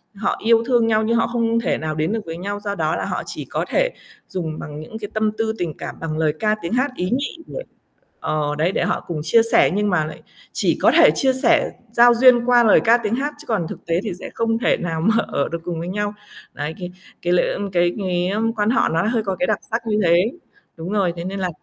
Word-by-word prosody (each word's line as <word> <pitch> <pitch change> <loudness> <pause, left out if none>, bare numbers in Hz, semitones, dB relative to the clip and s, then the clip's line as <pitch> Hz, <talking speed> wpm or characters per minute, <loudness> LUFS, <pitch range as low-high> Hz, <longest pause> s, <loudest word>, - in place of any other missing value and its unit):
họ - - -1
yêu 230 0 +4
thương 240 -3 +3
nhau, 220 0 +2
nhưng 230 +2 +1
họ - - +2
không 230 -1 0
thể - - 0
nào 155 -1 -3
đến 155 +3 0
được 225 - -1
với 165 0 -6
nhau, 200 +3 -4
do 205 -1 -4
đó 160 -3 0
là - - -3
họ - - -3
chỉ - - -6
có - - -2
thể - - +2 0.4
dùng 160 -4 -4
bằng 150 0 -7
những 155 +8 -8
cái 205 - -6
tâm 215 0 +1
tư 220 0 0
tình 165 -4 -3
cảm, - - -6
bằng 155 -1 -4
lời 155 -2 +1
ca 215 -1 +2
tiếng 170 +6 -4
hát 255 +3 +1
ý 180 - -2
nhị 275 +7 -2
để - - -6 0.6
ờ, 150 -1 -1
đấy 165 +5 +1
để - - 0
họ - - -1
cùng 165 -3 -3
chia 195 +9 +4
sẻ. - - +5
Nhưng 210 +1 +1
mà 170 -5 +1
lại 155 - -8 0.3
chỉ - - 0
có - - +5
thể - - +8
chia 265 -2 +2
sẻ 290 +4 +2 0.2
giao 240 +1 +6
duyên 240 0 +5
qua 245 -1 +5
lời 215 - +6
ca 235 +1 +5
tiếng 230 -1 -1
hát 285 +3 -2
chứ 300 - -12
còn 205 -8 0
thực - - -9
tế 170 +1 +1
thì 215 - -3
sẽ - - -7
không 225 0 0
thể - - +2
nào 165 -2 -3
mà 220 +5 +3
ở 140 - -1
được 170 - -4
cùng 170 -2 -4
với 170 - -5
nhau. 205 +2 -2 0.4
Đấy, 150 +2 -4
cái 180 0 -6 0.3
cái 175 0 +1
lễ 180 - +2
ờm, 200 -1 -4
cái 175 -1 +2
cái, 180 -1 0
ờm, 225 +3 0
quan 210 -1 0
họ 255 - +2
nó 165 +1 +1
hơi 225 -2 0
có 195 -2 -2
cái 270 - +1
đặc - - +1
sắc 230 0 -2
như 210 0 +1
thế. 175 +6 +3 0.5
Đúng 165 +2 -6
rồi, 195 -5 +1
thế 170 - -5
nên 195 +2 -4
là 185 -1 -1
205 Hz, 265 wpm, -21 LUFS, 170-230 Hz, 0.6 s, thể